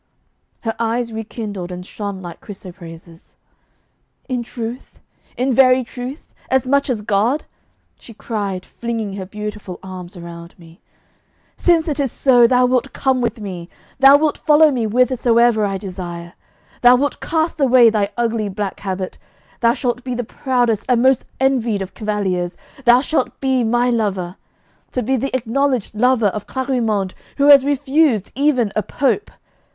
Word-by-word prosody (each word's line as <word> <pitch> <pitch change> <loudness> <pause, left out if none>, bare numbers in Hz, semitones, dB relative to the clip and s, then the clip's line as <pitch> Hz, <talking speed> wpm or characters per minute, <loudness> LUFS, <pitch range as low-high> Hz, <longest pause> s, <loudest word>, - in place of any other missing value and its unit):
Her 225 -1 -2
eyes 230 0 -1
rekindled 210 -4 -6
and 180 0 -7
shone 200 -2 -6
like 175 -1 -9
chrysoprases. 170 -4 -12 0.9
'In 255 -2 -2
truth? 235 +1 -7 0.4
in 255 +1 +1
very 255 0 +5
truth? 250 +4 -8 0.2
as 260 -1 +1
much 280 +1 +2
as 235 -4 -1
God!' 220 +8 +1 0.6
she 230 - -13
cried, 200 -5 -4
flinging 225 -4 -4
her 190 -2 -6
beautiful 210 -2 -6
arms 185 -1 -8
around 170 0 -10
me. 165 0 -17 0.7
'Since 340 -2 +2
it 295 -2 -2
is 275 -4 0
so, 245 -3 +5
thou 250 +1 +4
wilt 250 -1 0
come 265 -2 +1
with 230 -1 -2
me; 185 -4 -7 0.3
thou 270 +1 +8
wilt 305 0 0
follow 305 0 +5
me 245 -4 -1
whithersoever 235 -1 +3
I 195 -1 -1
desire. 175 -3 -7 0.5
Thou 245 0 +7
wilt 285 +3 -1
cast 320 -1 -1
away 250 -3 +6
thy 205 -2 0
ugly 230 -3 0
black 200 0 -4
habit. 190 -1 -4 0.4
Thou 235 0 +3
shalt 245 -1 -2
be 255 -2 -3
the 245 - -2
proudest 240 -2 0
and 245 -1 +3
most 265 -1 +3
envied 240 -6 +1
of 190 - -10
cavaliers; 195 -5 -2 0.3
thou 240 +1 +6
shalt 290 -2 -1
be 265 -2 +1
my 240 +2 +2
lover! 195 -6 -1 0.6
To 250 - -1
be 265 +4 +1
the 265 +2 -2
acknowledged 255 -1 0
lover 235 -1 +3
of 205 +1 -6
Clarimonde, 230 -8 -1 0.2
who 285 0 +4
has 280 -2 +9
refused 280 - +1
even 260 -6 +1
a 215 - +2
Pope! 275 - -1
235 Hz, 155 wpm, -19 LUFS, 200-260 Hz, 0.9 s, has